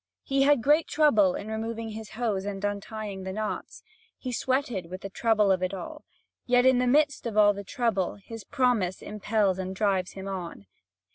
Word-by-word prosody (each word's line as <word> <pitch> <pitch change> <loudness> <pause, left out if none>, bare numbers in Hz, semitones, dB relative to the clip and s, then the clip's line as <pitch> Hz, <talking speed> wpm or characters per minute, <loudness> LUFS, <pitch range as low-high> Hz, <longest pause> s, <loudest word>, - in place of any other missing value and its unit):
He 275 0 +1
had 280 -3 +4
great 300 +3 +4
trouble 220 -12 +4
in 210 - -6
removing 225 +1 -4
his 215 -1 -8
hose 215 -6 -1
and 200 0 -4
in - - +4
untying 205 -1 -6
the 190 0 -5
knots. 215 +2 -5 0.3
He 255 - -5
sweated 245 -7 -1
with 185 +2 -8
the 195 - -7
trouble 215 -2 +2
of 185 -1 +2
it 185 +1 -1
all; 305 - -8 0.4
yet, 245 0 +4
in 260 -1 +5
the 250 - +1
midst 290 -1 +2
of 215 -2 -4
all 205 -1 +6
the 200 0 -7
trouble, 215 -5 -1
his 220 +2 -10
promise 225 -7 0
impels 210 -2 0
and 190 0 -4
drives 190 -3 0
him 190 0 -7
on. 180 - -6
215 Hz, 195 wpm, -27 LUFS, 195-245 Hz, 0.4 s, all